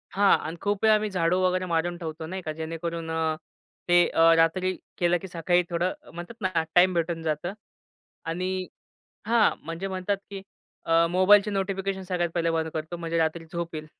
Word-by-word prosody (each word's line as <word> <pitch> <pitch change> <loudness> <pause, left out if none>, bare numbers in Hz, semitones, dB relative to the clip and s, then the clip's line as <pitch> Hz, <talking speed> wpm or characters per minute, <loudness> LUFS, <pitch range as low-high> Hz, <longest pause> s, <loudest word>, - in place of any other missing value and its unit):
हां, 200 0 +4
आणि 160 +2 -6
खूप 205 0 -1
वेळा 220 -1 +6
आम्ही 215 0 0
झाडू 180 -1 +1
वगैरे 185 0 +1
मारून 175 0 -1
ठेवतो 160 -2 -6
नाही 190 +3 -5
का. 160 - -4
जेणेकरून 165 +1 -5
अ, 160 -1 0 0.5
ते 175 0 +6
अ, 165 0 +5
रात्री 185 +3 +2 0.2
केलं, 175 0 +2
की 190 - -7
सकाळी 175 0 +1
थोडं 175 +1 0 0.2
म्हणतात 175 +7 -9
ना 185 -4 0
टाईम 180 +1 +6
भेटून 165 -1 -1
जातं. 160 +4 -2 0.7
आणि 185 +2 -2 0.6
हां. 230 -1 +4
म्हणजे 165 +4 -4
म्हणतात 190 +1 -1
की 195 -1 -7 0.4
अ, 165 0 +4
मोबाईलची 200 +3 +5
नोटिफिकेशन 195 -1 -2
सगळ्यात 180 -2 -1
पहिले 170 -1 +1
बंद 160 -1 -1
करतो, 160 +2 -4
म्हणजे 170 -1 -3
रात्री 165 +1 0
झोप 170 -1 -4
येईल, 155 0 -5
175 Hz, 175 wpm, -26 LUFS, 165-185 Hz, 0.7 s, वेळा